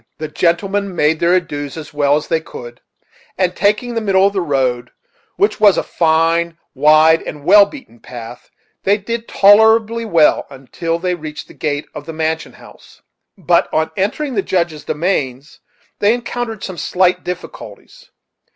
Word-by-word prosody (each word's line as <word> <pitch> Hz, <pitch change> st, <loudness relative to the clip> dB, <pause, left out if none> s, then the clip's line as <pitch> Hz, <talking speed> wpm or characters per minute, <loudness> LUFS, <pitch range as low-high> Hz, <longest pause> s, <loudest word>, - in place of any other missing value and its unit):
The 155 Hz, -, -5 dB
gentlemen 190 Hz, +4 st, -1 dB
made 155 Hz, 0 st, +1 dB
their 170 Hz, +2 st, +3 dB
adieus 145 Hz, -5 st, -3 dB
as 155 Hz, -2 st, -9 dB
well 145 Hz, -1 st, +2 dB
as 150 Hz, -, -3 dB
they 165 Hz, -1 st, 0 dB
could, 120 Hz, -5 st, -11 dB, 0.6 s
and 185 Hz, -1 st, 0 dB
taking 210 Hz, +4 st, 0 dB
the 230 Hz, -, -2 dB
middle 195 Hz, -2 st, +3 dB
of 200 Hz, -, +1 dB
the 195 Hz, -, -1 dB
road, 130 Hz, -6 st, -1 dB, 0.5 s
which 405 Hz, +2 st, 0 dB
was 205 Hz, -3 st, +5 dB
a -, -, 0 dB
fine, 165 Hz, +1 st, +1 dB, 0.2 s
wide, 155 Hz, +3 st, +5 dB
and 150 Hz, -1 st, -8 dB
well 200 Hz, +3 st, +7 dB
beaten 200 Hz, -, -13 dB
path, 120 Hz, 0 st, -10 dB, 0.3 s
they 200 Hz, +2 st, +2 dB
did 230 Hz, +3 st, -5 dB
tolerably 220 Hz, +3 st, +4 dB
well 165 Hz, -8 st, +3 dB
until 140 Hz, +5 st, -4 dB
they 180 Hz, +1 st, -2 dB
reached 155 Hz, -3 st, -7 dB
the -, -, -13 dB
gate 145 Hz, -1 st, -3 dB
of -, -, -9 dB
the 165 Hz, -, -6 dB
mansion 160 Hz, 0 st, -3 dB
house: -, -, -18 dB, 0.3 s
but 175 Hz, -1 st, +1 dB
on 160 Hz, 0 st, 0 dB
entering 235 Hz, +9 st, -2 dB
the 205 Hz, -, 0 dB
Judge's 170 Hz, -5 st, -2 dB
domains 150 Hz, -5 st, -3 dB, 0.4 s
they 210 Hz, +3 st, +3 dB
encountered 240 Hz, -2 st, -5 dB
some 185 Hz, -3 st, -6 dB
slight 180 Hz, 0 st, +1 dB
difficulties. 180 Hz, -, -9 dB
170 Hz, 160 wpm, -17 LUFS, 150-200 Hz, 0.6 s, well